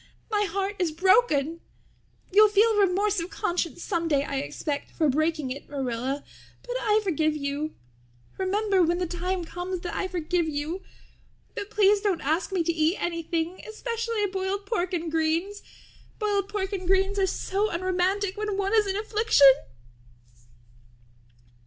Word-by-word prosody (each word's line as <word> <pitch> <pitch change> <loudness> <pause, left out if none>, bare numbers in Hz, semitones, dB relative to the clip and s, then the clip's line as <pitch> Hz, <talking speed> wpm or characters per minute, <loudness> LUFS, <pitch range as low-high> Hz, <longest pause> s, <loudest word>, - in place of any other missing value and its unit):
My 415 -1 +2
heart 395 +1 -2
is 350 -3 +1
broken. 335 - +3 0.7
You'll 425 +2 +7
feel 425 +2 +4
remorse 400 0 +2
of 335 +2 -4
conscience 350 - -2
someday, 330 -7 0
I 280 -1 -3
expect, 285 +1 -3
for 315 - 0
breaking 310 -1 0
it, 275 +2 -7
Marilla, 265 0 -3 0.4
but - - -5
I 425 0 +3
forgive 310 -5 +1
you. 285 +2 -3 0.6
Remember 390 0 +1
when 345 0 +2
the 360 - -1
time 355 +1 -3
comes 355 +1 -5
that 350 - -5
I 385 - -1
forgive 350 -2 -1
you. 305 +5 -3 0.7
But 405 - -5
please 415 -1 +4
don't 395 -5 +1
ask 315 +8 0
me 370 -3 +1
to 335 +1 0
eat 320 +3 +1
anything, 335 +1 -2
especially 460 -1 -2
boiled 385 +1 -2
pork 390 -4 -1
and 330 -1 -3
greens. 330 +6 0 0.6
Boiled 410 -2 0
pork 400 -1 -3
and 370 -2 -4
greens 385 +1 +2
are 380 - +3
so 400 +3 -1
unromantic 370 +2 0
when 420 -1 -2
one 395 +1 0
is 430 -2 +4
in 390 0 -1
affliction." 425 -10 +5
370 Hz, 150 wpm, -26 LUFS, 325-405 Hz, 0.7 s, You'll